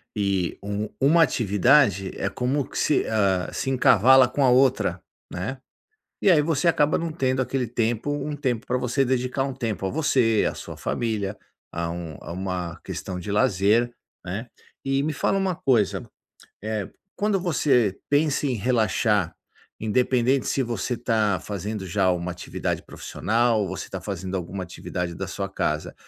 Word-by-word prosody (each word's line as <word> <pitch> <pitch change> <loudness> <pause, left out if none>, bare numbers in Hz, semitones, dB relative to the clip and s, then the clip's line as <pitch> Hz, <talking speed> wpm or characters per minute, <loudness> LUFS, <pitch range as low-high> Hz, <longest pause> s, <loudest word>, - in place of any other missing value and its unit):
e 100 -3 0
u 105 +1 -3
1 160 +5 +5
atividade, 105 - +3
é 100 - -1
como 130 +6 -1
que - - -8
se 150 - +2
ah, 100 -4 +1
se 135 - -2
encavala 130 0 +6
com 140 +3 0
a 130 - +5
outra, 125 -8 +3 0.3
né. 100 +10 -4 0.6
E - - +3
aí 155 -4 +5
você 160 +1 0
acaba 150 -3 +3
não 165 -1 -3
tendo 130 -4 0
aquele 130 -2 -1
tempo 115 +3 -1
um 145 +1 -2
tempo 130 -6 -2
pra - - 0
você 125 +2 +1
dedicar 130 +1 0
um 135 -1 -3
tempo 115 -6 -3
a - - -1
você, 125 -8 +2
à - - -9
sua - - -8
família, 105 -4 -2 0.4
a 85 0 -2
um 85 -3 -6
a - - -7
uma 90 -2 -4
questão 90 -2 -5
de 100 - -6
lazer, 105 +4 +2 0.3
né. 100 +7 -5 0.4
E 135 0 +1
me 155 - -1
fala 195 +6 0
uma 190 -2 0
coisa, 120 - +1 0.6
eh, 110 -2 -3 0.3
quando 205 -1 +1
você 125 - +2
pensa 145 0 +2
em 130 - 0
relaxar, 105 -5 +1 0.4
independente 125 +3 +1
se 135 - +1
você 120 +1 -2
tá 110 -5 +1
fazendo 105 0 -5
já 95 +1 +2
uma 90 0 -2
atividade 90 - -4
profissional 115 +1 0
ou 100 - -1
você 95 - -5
tá 95 - -5
fazendo 95 0 -4
alguma 95 +1 -4
atividade 90 0 -5
da - - -4
sua 100 -1 -4
casa, 75 -5 -2
115 Hz, 165 wpm, -24 LUFS, 95-135 Hz, 0.6 s, encavala